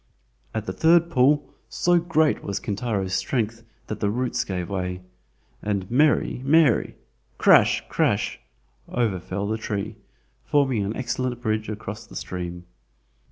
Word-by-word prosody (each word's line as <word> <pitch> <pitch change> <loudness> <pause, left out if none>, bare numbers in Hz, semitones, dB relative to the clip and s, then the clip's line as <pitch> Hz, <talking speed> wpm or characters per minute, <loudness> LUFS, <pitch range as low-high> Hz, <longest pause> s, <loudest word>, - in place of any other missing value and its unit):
At 110 -1 -2
the - - -3
third 170 +1 +4
pull, 145 +1 +3 0.2
so 175 0 +3
great 160 -2 +1
was 100 - -3
Kintaro's 100 -3 -2
strength 115 +3 -1 0.2
that 110 - -5
the 105 - +1
roots 125 +3 -1
gave 90 -3 -4
way, 90 -1 -3 0.6
and 100 -2 -2
"meri, 145 -1 +3
meri" 145 -3 +3 0.4
(crash, - - +5
crash), - - 0 0.5
over 110 -6 0
fell 95 +3 -4
the 110 +1 -2
tree, 105 0 -3 0.5
forming 135 -7 +2
an 100 +3 -3
excellent 125 -1 -2
bridge 110 -2 -1
across 105 +1 -6
the - - -13
stream. 90 -1 -5
110 Hz, 135 wpm, -24 LUFS, 100-130 Hz, 0.6 s, crash